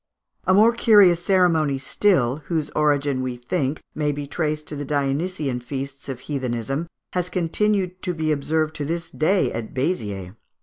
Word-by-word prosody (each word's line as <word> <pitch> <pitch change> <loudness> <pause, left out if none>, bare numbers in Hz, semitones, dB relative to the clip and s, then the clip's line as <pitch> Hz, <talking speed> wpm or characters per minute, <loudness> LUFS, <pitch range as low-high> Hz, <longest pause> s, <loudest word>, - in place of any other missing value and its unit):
A 185 - +4
more 220 +4 +6
curious 200 -7 +5
ceremony 165 -7 +3
still, 135 -3 +2
whose 160 -4 -1
origin, 145 -3 +1
we 125 -1 -3
think, 135 +3 -2
may 150 -1 0
be 145 0 -4
traced 150 0 -2
to 150 - -5
the 145 - -4
Dionysian 145 0 -1
feasts 135 +2 -6
of 130 -2 -5
heathenism, 135 +2 -3 0.3
has 180 -1 -1
continued 185 +1 0
to 180 -3 -2
be 155 -1 0
observed 155 +2 0
to 145 - -3
this 165 +2 -3
day 185 +5 +1
at 115 +2 -6
Béziers. 105 - -2
150 Hz, 160 wpm, -23 LUFS, 135-175 Hz, 0.3 s, more